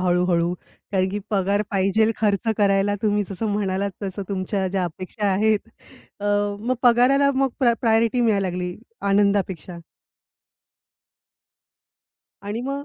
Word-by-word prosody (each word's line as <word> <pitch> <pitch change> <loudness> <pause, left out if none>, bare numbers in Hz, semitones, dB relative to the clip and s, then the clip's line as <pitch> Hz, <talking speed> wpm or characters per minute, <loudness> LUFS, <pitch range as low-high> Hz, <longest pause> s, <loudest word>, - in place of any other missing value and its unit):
हळू-हळू 175 -1 +1
कारण 185 +1 -4
की 200 +2 -3
पगार 200 0 +1
पाहिजेल 205 +3 +2
खर्च 210 +1 0
करायला 200 0 +2
तुम्ही 210 -1 +2
जसं 200 +3 -3
म्हणालात 200 -1 -1
तसं 195 0 -4
तुमच्या 190 0 -2
ज्या 185 0 -1
अपेक्षा 185 +5 -4
आहेत. 215 +2 +2 0.6
अ, - - -6 0.4
मग 250 +3 0
पगाराला 255 +3 +5
मग 270 +1 +2
प्रा 240 -2 +5
प्रायोरिटी 230 +1 +2
मिळायला 205 -4 +2
लागली 180 0 -4 0.3
आनंदापेक्षा. 195 -3 +1 2.7
आणि 210 +3 -4
मग 280 +1 -4
200 Hz, 120 wpm, -22 LUFS, 190-220 Hz, 2.7 s, पगाराला